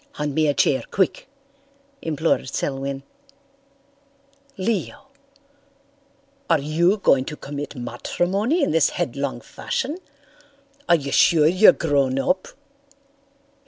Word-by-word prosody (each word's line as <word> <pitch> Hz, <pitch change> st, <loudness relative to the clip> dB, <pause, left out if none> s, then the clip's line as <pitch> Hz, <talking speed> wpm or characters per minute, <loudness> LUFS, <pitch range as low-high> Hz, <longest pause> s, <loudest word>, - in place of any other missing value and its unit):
"Hand 150 Hz, -1 st, -3 dB
me 155 Hz, +1 st, +2 dB
a 145 Hz, -, +2 dB
chair, 135 Hz, -, +2 dB
quick," 190 Hz, +6 st, -1 dB, 0.7 s
implored 160 Hz, -3 st, -1 dB
Selwyn. 135 Hz, 0 st, -3 dB, 1.5 s
"Leo, 230 Hz, +8 st, -3 dB, 1.4 s
are 165 Hz, -, +5 dB
you 165 Hz, +7 st, +1 dB
going 135 Hz, -9 st, +3 dB
to 150 Hz, -, -6 dB
commit 145 Hz, +1 st, -7 dB
matrimony 185 Hz, -, -1 dB
in -, -, +1 dB
this 160 Hz, -1 st, +3 dB
headlong 135 Hz, -1 st, -3 dB
fashion? 295 Hz, -, -4 dB, 0.9 s
Are 170 Hz, -, +7 dB
you 140 Hz, -4 st, -4 dB
sure 155 Hz, +1 st, +4 dB
you're 185 Hz, +7 st, +7 dB
grown 140 Hz, -4 st, 0 dB
up?" 180 Hz, +7 st, 0 dB
155 Hz, 105 wpm, -22 LUFS, 140-185 Hz, 1.5 s, Are